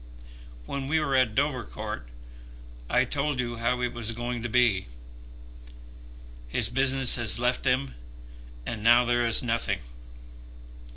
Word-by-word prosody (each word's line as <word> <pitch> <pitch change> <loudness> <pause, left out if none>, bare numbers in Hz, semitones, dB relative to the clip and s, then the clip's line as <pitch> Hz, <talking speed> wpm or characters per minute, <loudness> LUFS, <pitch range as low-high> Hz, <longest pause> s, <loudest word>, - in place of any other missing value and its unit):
When 135 - -4
we 160 +3 +2
were 140 -3 0
at 130 -4 +2
Dovercourt, 125 - -3 0.8
I - - +3
told 145 -2 -2
you 120 -1 -2
how 120 +2 0
it 125 -1 -1
was 115 -1 -2
going 120 +1 -4
to 120 - -4
be. 115 - +2 1.6
His - - 0
business 135 0 +3
has 115 -2 +1
left 125 +1 0
him, 130 +2 +1 0.7
and 105 -2 -5
now 120 +2 +6
there 120 0 +1
is 115 +1 +3
nothing. 115 - -1
120 Hz, 130 wpm, -27 LUFS, 115-130 Hz, 1.6 s, now